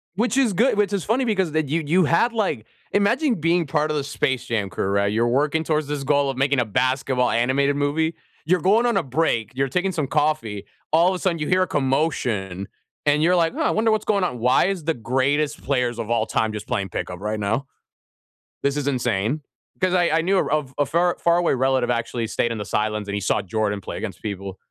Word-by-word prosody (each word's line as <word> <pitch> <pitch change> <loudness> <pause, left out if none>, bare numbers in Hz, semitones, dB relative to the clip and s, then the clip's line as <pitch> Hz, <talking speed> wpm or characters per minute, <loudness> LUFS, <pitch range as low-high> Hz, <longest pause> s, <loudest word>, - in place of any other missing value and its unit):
Which 240 +6 0
is 240 -7 +3
good 230 +4 +2
which 205 -1 +1
is 195 -4 -1
funny 255 +4 +1
because 190 -8 0
that 155 -1 0
you 160 +2 0
you 175 +3 +3
had, 170 +10 +2
like 195 - -1 0.3
imagine 235 +7 +2
being 165 0 +1
part 150 +2 0
of 155 - -1
the 145 - -1
Space 135 -2 -1
Jam 105 -4 -1
crew, - - -3
right? 100 +1 +1
You're 115 +3 +1
working 145 +6 +1
towards 155 -2 0
this 145 -2 -3
goal 140 0 +2
of 135 - -4
making 140 0 +2
a 125 - +1
basketball 130 +3 +1
animated 135 +4 +1
movie. 155 +3 0 0.3
You're 180 0 +2
going 215 +6 +3
on 240 - +2
a - - +2
break, 125 -5 0
you're 135 +1 +1
taking 180 +8 0
some 155 -6 -2
coffee, 145 -9 -1 0.3
all 170 +3 +5
of 190 - -1
a - - -5
sudden, 175 -3 0
you 150 - -2
hear 185 0 +3
a - - -3
commotion. 125 - -1 0.4
And 145 +1 +3
you're 175 +3 +4
like, 165 -2 +2
"Oh, - - -3
I - - +2
wonder 220 +1 +2
what's 215 - +1
going 200 -3 +1
on. 125 -9 -2
Why 125 +3 +3
is 190 -4 -2
the 165 0 0
greatest 135 +5 0
players 125 -4 -1
of 115 -1 -4
all 120 - +1
time 110 -1 0
just 105 0 -6
playing 100 -6 -2
pickup 90 0 -5
right 105 +2 -3
now? 110 +7 -1 1.0
This 140 0 +1
is 145 - -2
insane." 125 +1 -1 0.4
'Cause 185 -1 +2
I 180 -2 +3
I 160 +1 +3
knew 190 +2 +2
a 150 -4 0
a 145 - +2
far 175 +3 +1
far 170 0 +3
away 175 - +2
relative 130 -1 +1
actually 115 0 -2
stayed 120 +1 0
in 115 - -5
the 105 - -4
sidelines 105 0 -1
and 100 - -3
he 105 - -1
saw 100 - 0
Jordan 105 +1 -2
play - - -6
against - - -6
people. 100 -2 -5
145 Hz, 235 wpm, -22 LUFS, 115-170 Hz, 1.0 s, all